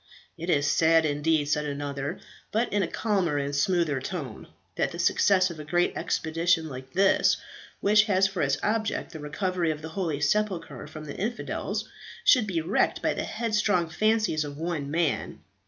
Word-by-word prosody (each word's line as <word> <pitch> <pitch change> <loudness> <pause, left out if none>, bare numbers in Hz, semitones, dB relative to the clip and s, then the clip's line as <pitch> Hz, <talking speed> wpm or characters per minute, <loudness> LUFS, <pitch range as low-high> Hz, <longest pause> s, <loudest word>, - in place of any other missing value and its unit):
"It 170 +1 -6
is 145 -4 +3
sad 160 +1 +4
indeed," 150 +1 +1
said 150 +1 0
another, 145 +2 -4 0.3
but 225 +1 0
in 205 - +2
a 180 - 0
calmer 190 -9 0
and 140 0 -2
smoother 165 -2 +1
tone, - - -6 0.3
"that - - 0
the - - -7
success 185 -2 +3
of 160 - -9
a - - -6
great 175 +4 +1
expedition 165 0 0
like 130 -1 -9
this, 195 +1 +4 0.4
which 210 +1 +5
has 195 -3 +3
for 190 -2 -1
its 140 -1 +1
object 215 0 -1
the 160 - -8
recovery 170 +3 -1
of 155 -1 -3
the 160 - -5
holy 160 -4 -2
sepulchre 165 -4 -1
from 155 0 -9
the 145 - -7
infidels, 235 +5 -3 0.4
should 245 -6 +5
be 170 -4 -1
wrecked 175 +7 0
by - - +2
the - - -3
headstrong 210 -7 0
fancies 215 -2 +1
of 145 -1 -7
one 160 -3 -3
man. 165 0 -1
165 Hz, 175 wpm, -27 LUFS, 150-195 Hz, 0.4 s, which